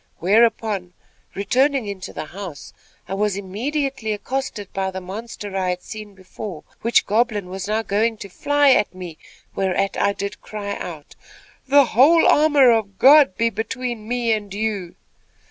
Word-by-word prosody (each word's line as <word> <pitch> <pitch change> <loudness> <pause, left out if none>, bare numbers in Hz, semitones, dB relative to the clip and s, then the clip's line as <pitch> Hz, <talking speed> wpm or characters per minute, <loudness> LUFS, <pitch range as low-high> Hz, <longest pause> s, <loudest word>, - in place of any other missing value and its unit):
Whereupon, 210 -2 +1 0.4
returning 260 +5 +1
into 200 -3 -6
the - - -6
house, 180 -5 -9 0.3
I - - -5
was 205 0 0
immediately 235 +4 -3
accosted 215 -2 -4
by 190 0 -1
the 190 0 -5
monster 205 +1 -7
I 185 -1 0
had 180 0 -3
seen 215 -2 -9
before, 185 -2 -8 0.2
which 230 +1 +3
goblin 210 -3 0
was 190 +1 -5
now 215 +1 0
going 220 +3 0
to 200 - -8
fly 290 +8 +2
at 210 -7 +2
me; 175 -4 -9 0.3
whereat 195 +1 -1
I 200 - +2
did 200 +1 -6
cry 205 -1 -5
out: 160 -5 -8 0.5
"'The 280 +1 +6
whole 280 +9 +5
armor 290 -4 +5
of 210 -4 0
God 275 -7 +6
be 230 0 +1
between 230 +1 -4
me 240 -1 0
and 205 -2 -4
you!' 200 -4 -3
210 Hz, 155 wpm, -21 LUFS, 190-240 Hz, 0.5 s, The